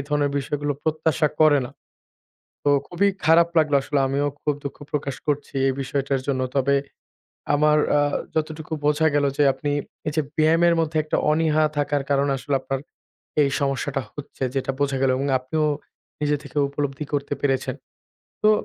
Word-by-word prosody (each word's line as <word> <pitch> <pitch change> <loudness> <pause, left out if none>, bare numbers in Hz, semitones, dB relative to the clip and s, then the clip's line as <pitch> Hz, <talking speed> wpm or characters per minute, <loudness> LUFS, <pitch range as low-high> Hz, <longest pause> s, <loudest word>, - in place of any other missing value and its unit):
ধরনের 145 -1 +1
বিষয়গুলো 145 +1 -2
প্রত্যাশা 155 -1 +1
করেনা। 145 -5 +4 0.9
তো 145 - +2 0.2
খুবই 180 +3 +1 0.2
খারাপ 165 +1 +6
লাগলো 150 -2 +4
আসলেও, 140 0 0
আমিও 140 +2 0
খুব 150 - +1
দুঃখ 140 - -6
প্রকাশ 140 -2 -2
করছি, 145 -1 -1
এই 135 - +2
বিষয়টার 135 0 -1
জন্য। 130 -2 0
তবে 140 +1 +3 0.8
আমার 150 +1 +4 0.2
আ - - +4 0.3
যতটুকু 155 0 -3
বোঝা 150 +2 +3
গেল 145 - +3
যে 145 - +4
আপনি 145 -1 -3 0.4
এই 150 - +1
যে 155 - +3 0.2
ব্যায়ামের 165 +2 +4
মধ্যে 160 -1 0
একটা 155 - -1
অনীহা 155 0 +2
থাকার 145 -1 0
কারণে 140 0 +2
আসলে 140 +1 -2
আপনার 135 0 -3 0.6
এই 140 - +3
সমস্যাটা 135 0 -1
হচ্ছে। 145 -2 -9
যেটা 135 0 -1
বোঝা 140 -1 +1
গেল 135 - +3
এবং 135 +2 -1
আপনিও 155 +5 -1 0.6
নিজে 150 0 +1
থেকে 145 - -13
উপলব্ধি 140 0 -3
করতে 145 0 -2
পেরেছেন। 135 -2 0 0.7
তো 215 - +6
145 Hz, 160 wpm, -23 LUFS, 140-155 Hz, 0.9 s, খারাপ